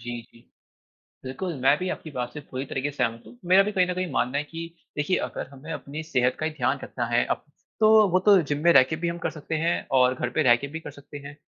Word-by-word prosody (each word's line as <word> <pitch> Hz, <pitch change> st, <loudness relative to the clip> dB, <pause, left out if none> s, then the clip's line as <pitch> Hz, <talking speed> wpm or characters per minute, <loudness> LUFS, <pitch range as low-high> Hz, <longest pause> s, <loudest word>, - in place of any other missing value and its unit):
जी, 120 Hz, 0 st, -5 dB
जी। 115 Hz, -, -21 dB, 0.8 s
बिल्कुल, 150 Hz, +7 st, -4 dB
मैं 135 Hz, +3 st, +5 dB
भी 185 Hz, +2 st, -3 dB
आपकी 155 Hz, -, -6 dB
बात 125 Hz, -2 st, -4 dB
से 150 Hz, -, -6 dB
पूरी 130 Hz, +1 st, -4 dB
तरीक़े 135 Hz, +2 st, -3 dB
से 145 Hz, -, -19 dB
सहमत 115 Hz, -1 st, -1 dB
हूँ। 115 Hz, +2 st, -14 dB
मेरा 190 Hz, +2 st, +7 dB
भी 210 Hz, -, -2 dB
कहीं 185 Hz, -3 st, +2 dB
न 180 Hz, -, -1 dB
कहीं 185 Hz, -2 st, -3 dB
मानना 130 Hz, +1 st, 0 dB
है 145 Hz, -, 0 dB
कि 165 Hz, +3 st, -7 dB, 0.3 s
देखिये 150 Hz, +5 st, +1 dB
अगर -, -, -6 dB
हमें 140 Hz, +4 st, -10 dB
अपनी 150 Hz, +2 st, -6 dB
सेहत 125 Hz, -4 st, +1 dB
का 155 Hz, -, -1 dB
ही 160 Hz, -, -1 dB
ध्यान 140 Hz, -2 st, -1 dB
रखना 120 Hz, -, -3 dB
है 120 Hz, +1 st, +2 dB
अब, -, -, -2 dB, 0.4 s
तो 215 Hz, -1 st, +6 dB
वो 185 Hz, -, +3 dB
तो 200 Hz, -3 st, +7 dB
जिम 145 Hz, -1 st, -2 dB
में 170 Hz, -, +6 dB
रह 135 Hz, -, +8 dB
के 160 Hz, -, +1 dB
भी 170 Hz, +2 st, -3 dB
हम 170 Hz, -, -4 dB
कर -, -, +2 dB
सकते 155 Hz, 0 st, -5 dB
हैं 170 Hz, -, +2 dB, 0.2 s
और 125 Hz, 0 st, +4 dB
घर 125 Hz, -1 st, -3 dB
पे 155 Hz, -, +4 dB
रह 120 Hz, -3 st, +6 dB
के 140 Hz, +4 st, -5 dB
भी -, -, -3 dB
कर -, -, -9 dB
सकते 145 Hz, +1 st, -11 dB
हैं। 145 Hz, +1 st, -10 dB
145 Hz, 275 wpm, -25 LUFS, 125-170 Hz, 0.8 s, रह